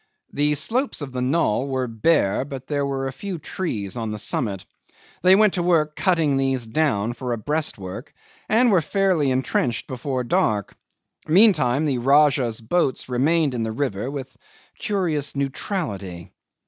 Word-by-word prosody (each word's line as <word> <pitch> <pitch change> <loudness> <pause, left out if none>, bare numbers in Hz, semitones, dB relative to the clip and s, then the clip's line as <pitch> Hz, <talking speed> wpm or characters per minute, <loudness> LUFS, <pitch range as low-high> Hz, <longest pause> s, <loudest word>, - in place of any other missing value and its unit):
The 150 +1 +2
slopes 245 - -1
of 135 -3 -8
the 125 - -2
knoll 130 -2 +1
were 130 -2 -1
bare, 115 -2 +1
but 135 -2 -8
there 145 -1 -1
were 135 -1 -2
a 135 - -5
few 195 +4 -5
trees 120 - -4
on 115 -2 -3
the 105 - -4
summit. 100 -2 -2 0.6
They 185 +2 +6
went 210 -1 +4
to 180 - -1
work 160 -3 +2
cutting 165 -7 +2
these 135 -2 0
down 115 -4 0
for 125 0 -4
a - - -2
breastwork, 110 -8 -3 0.4
and 235 +2 +4
were 185 -4 +4
fairly 185 -5 +1
intrenched 130 -2 0
before 130 0 -3
dark; 105 -4 0 0.5
meantime 155 - +4
the 135 -5 0
Rajah's 135 -3 +3
boats 130 +2 0
remained 145 +4 +2
in 120 - -2
the 110 0 -2
river 115 -2 -2
with 135 -2 -7 0.4
curious 165 -9 -1
neutrality. 105 - -4
135 Hz, 155 wpm, -23 LUFS, 120-160 Hz, 0.6 s, They